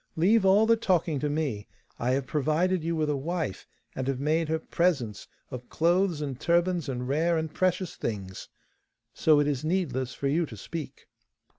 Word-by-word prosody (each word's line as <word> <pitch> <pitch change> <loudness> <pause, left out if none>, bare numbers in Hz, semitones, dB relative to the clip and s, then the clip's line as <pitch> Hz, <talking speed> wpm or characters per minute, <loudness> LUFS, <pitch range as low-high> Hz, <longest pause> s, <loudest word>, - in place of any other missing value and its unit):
Leave 195 +6 +4
all 195 +3 +5
the 230 +1 +5
talking 175 -9 +1
to 150 - -1
me. 145 -9 -2 0.3
I 125 +2 +1
have 135 0 0
provided 155 +6 +1
you 165 +1 -1
with 155 -1 0
a - - 0
wife, 155 - -3 0.3
and 130 0 -3
have 135 -2 -1
made 155 +3 +1
her 160 - +1
presents 155 - -1 0.2
of 125 -2 -8
clothes 175 0 +1
and 135 -4 -4
turbans 170 -2 +1
and 125 -1 -3
rare 165 +5 +1
and 160 -1 -3
precious 185 -1 0
things, 95 -4 -5 0.6
so 155 -2 +4
it 145 - +3
is 145 -2 -1
needless 150 -7 -1
for 140 - -2
you 160 +4 +1
to 110 - -10
speak. 145 +4 -7
155 Hz, 180 wpm, -27 LUFS, 135-175 Hz, 0.6 s, all